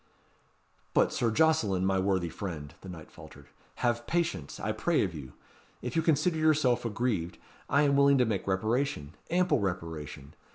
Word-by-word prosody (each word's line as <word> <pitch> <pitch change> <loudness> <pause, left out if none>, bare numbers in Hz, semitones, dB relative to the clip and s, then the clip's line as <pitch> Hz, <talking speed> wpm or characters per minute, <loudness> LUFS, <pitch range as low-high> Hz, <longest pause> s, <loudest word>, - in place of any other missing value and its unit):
"But - - +3
Sir 120 - +1
Jocelyn, 110 -8 +2
my 95 0 +2
worthy 95 -2 0
friend," 80 -7 -6
the 95 - -10
knight 85 -3 -10
faltered, - - -14 0.4
"have 120 0 0
patience, 165 - -2
I 110 - -1
pray 155 +10 +1
of 95 -3 -3
you. 70 -5 -9 0.5
If - - -4
you 165 - +3
consider 160 +1 +2
yourself 155 -6 +3
aggrieved, 105 -6 -1 0.3
I 145 +2 +4
am 140 -1 +3
willing 140 0 +5
to 125 - +4
make 105 -4 -2
reparation 100 - -1 0.2
ample 180 -3 +2
reparation. 80 -7 -5
110 Hz, 160 wpm, -29 LUFS, 90-140 Hz, 0.5 s, willing